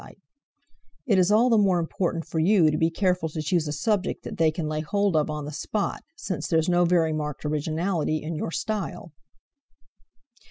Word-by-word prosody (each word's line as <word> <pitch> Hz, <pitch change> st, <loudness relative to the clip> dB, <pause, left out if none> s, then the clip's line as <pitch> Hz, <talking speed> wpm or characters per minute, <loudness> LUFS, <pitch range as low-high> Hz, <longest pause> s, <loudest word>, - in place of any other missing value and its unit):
It 205 Hz, -8 st, +3 dB
is 185 Hz, +2 st, +3 dB
all 235 Hz, +4 st, +4 dB
the 225 Hz, -, +5 dB
more 195 Hz, -3 st, +3 dB
important 165 Hz, 0 st, -2 dB
for 160 Hz, -, -3 dB
you 170 Hz, -2 st, +4 dB
to 150 Hz, -, -1 dB
be 160 Hz, -, +3 dB
careful 180 Hz, -1 st, 0 dB
to 155 Hz, -, -6 dB
choose 155 Hz, +1 st, 0 dB
a -, -, -2 dB
subject 195 Hz, +6 st, -1 dB
that -, -, -7 dB
they 160 Hz, -1 st, +4 dB
can 155 Hz, 0 st, -3 dB
lay 155 Hz, 0 st, -2 dB
hold 200 Hz, +3 st, 0 dB
of 155 Hz, 0 st, +2 dB
on 150 Hz, -1 st, -4 dB
the 150 Hz, -, -6 dB
spot, 205 Hz, +7 st, -3 dB
since 185 Hz, -, -4 dB
there's 160 Hz, -1 st, +1 dB
no 175 Hz, 0 st, +3 dB
very 170 Hz, -2 st, +2 dB
marked 150 Hz, -1 st, -4 dB
originality 155 Hz, +1 st, -1 dB
in 160 Hz, +2 st, -4 dB
your 155 Hz, -, -3 dB
style." 200 Hz, -2 st, -4 dB
165 Hz, 190 wpm, -25 LUFS, 155-190 Hz, -, the